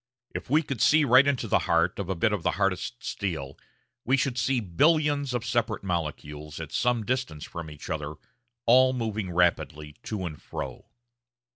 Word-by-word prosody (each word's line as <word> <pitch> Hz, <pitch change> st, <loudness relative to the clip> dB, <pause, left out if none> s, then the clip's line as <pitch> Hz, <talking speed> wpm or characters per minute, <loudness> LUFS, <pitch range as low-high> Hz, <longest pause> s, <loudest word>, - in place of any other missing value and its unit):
If -, -, -6 dB
we 155 Hz, +4 st, +4 dB
could 135 Hz, -6 st, -4 dB
see 155 Hz, 0 st, +5 dB
right 130 Hz, +2 st, +6 dB
into 130 Hz, -5 st, 0 dB
the -, -, +3 dB
heart 85 Hz, +3 st, +2 dB
of 100 Hz, -2 st, -4 dB
a 95 Hz, -, 0 dB
bit 105 Hz, +6 st, +1 dB
of 100 Hz, -, -1 dB
the -, -, 0 dB
hardest 100 Hz, +5 st, -1 dB
steel, 80 Hz, -9 st, -4 dB, 0.5 s
we 135 Hz, +2 st, +2 dB
should 135 Hz, -2 st, 0 dB
see 125 Hz, +1 st, +1 dB
billions 145 Hz, -, +2 dB
of 120 Hz, -2 st, -2 dB
separate 115 Hz, -3 st, -1 dB
molecules, 75 Hz, -4 st, -4 dB
at 80 Hz, -2 st, -7 dB
some 120 Hz, -3 st, +1 dB
distance 125 Hz, -, -2 dB
from 85 Hz, -2 st, -7 dB
each 75 Hz, -1 st, -10 dB
other, 75 Hz, 0 st, -4 dB, 0.5 s
all 130 Hz, +2 st, +6 dB
moving 110 Hz, -5 st, -2 dB
rapidly 85 Hz, -4 st, 0 dB
to 105 Hz, -4 st, -3 dB
and 75 Hz, -4 st, -7 dB
fro. -, -, -7 dB
105 Hz, 175 wpm, -27 LUFS, 85-125 Hz, 0.5 s, right